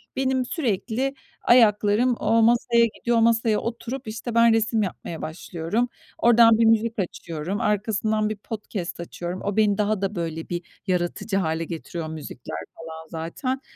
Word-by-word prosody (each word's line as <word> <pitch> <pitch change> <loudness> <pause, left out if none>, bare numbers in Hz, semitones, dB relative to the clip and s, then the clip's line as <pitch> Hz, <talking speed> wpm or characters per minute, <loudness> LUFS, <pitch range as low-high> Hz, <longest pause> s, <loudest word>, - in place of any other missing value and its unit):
benim 260 -1 +1
sürekli 255 - -1 0.3
ayaklarım 225 +1 +4
o 230 0 +3
masaya 235 +1 +4
gidiyor, 235 -1 0
o - - +4
masaya 225 -1 +3
oturup, 235 +2 -5
işte, 225 +2 -5
ben 230 -1 +6
resim 225 0 +2
yapmaya 170 -3 -5
başlıyorum. 170 +8 -2 0.3
Oradan 230 -1 +6
bir 230 - +4
müzik 225 0 +2
açıyorum. 175 +2 -4
Arkasından 215 0 0
bir 215 - -3
podcast 205 -5 -6
açıyorum. 175 +1 -5
O 205 +1 -2
beni 210 -2 +3
daha 210 -1 0
da 195 +1 -1
böyle 165 -1 -4
bir 175 0 -2 0.3
yaratıcı 180 +3 -1
hâle 160 -3 0
getiriyor 165 0 -5
müzikler 140 - -7 0.2
falan 160 0 -9
zaten. 170 - -4
215 Hz, 150 wpm, -24 LUFS, 175-230 Hz, 0.3 s, ben